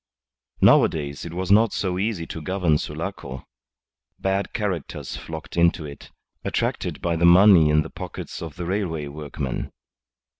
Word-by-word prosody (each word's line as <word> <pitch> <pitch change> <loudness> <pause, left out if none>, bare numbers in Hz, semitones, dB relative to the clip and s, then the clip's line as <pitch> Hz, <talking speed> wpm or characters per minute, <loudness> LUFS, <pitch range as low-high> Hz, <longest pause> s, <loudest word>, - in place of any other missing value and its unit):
Nowadays 70 -1 +3
it 85 - -7
was 95 +1 -2
not 110 +1 +5
so 90 -2 -1
easy 100 -5 -1
to 80 - -7
govern 85 -2 +1
Sulaco. 65 0 -6 0.7
Bad 95 +1 -1
characters 100 -9 -3
flocked 80 -1 -8
into 85 -2 +3
it, 70 -1 -10 0.3
attracted - - -2
by 85 -1 +1
the 85 - -1
money 90 -2 +7
in 75 0 +4
the - - -9
pockets - - -7
of 80 -3 -7
the 90 - -5
railway 85 -5 -2
workmen. 70 -2 -5
85 Hz, 145 wpm, -24 LUFS, 75-95 Hz, 0.7 s, money